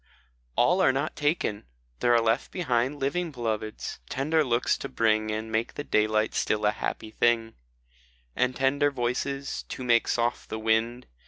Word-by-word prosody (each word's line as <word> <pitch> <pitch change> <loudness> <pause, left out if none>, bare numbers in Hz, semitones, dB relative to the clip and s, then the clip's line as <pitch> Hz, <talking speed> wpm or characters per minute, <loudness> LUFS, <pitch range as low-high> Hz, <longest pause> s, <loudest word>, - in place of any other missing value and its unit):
A - - +5
LL 180 +10 +3
are 130 - +5
not 140 +4 -2
taken! 145 - -1 0.3
there 120 - +3
are 120 -1 +5
left 115 +3 +1
behind 135 -5 0
Living 165 +6 -1
Beloveds, 110 -5 -4
tender 155 +4 +1
looks 120 -2 +1
to - - -5
bring, 110 -1 +1
And 110 +1 -3
make 115 +1 -1
the 145 - -4
daylight 110 -3 +1
still 105 0 0
a 105 - +4
happy 110 0 -4
thing, 115 -1 +1 0.8
And 125 0 +1
tender 140 +2 +2
voices, 135 +2 -2
to 130 - -5
make 120 -2 +3
soft 120 0 -1
the 110 - -3
wind. 110 +3 0
120 Hz, 165 wpm, -27 LUFS, 110-135 Hz, 0.8 s, A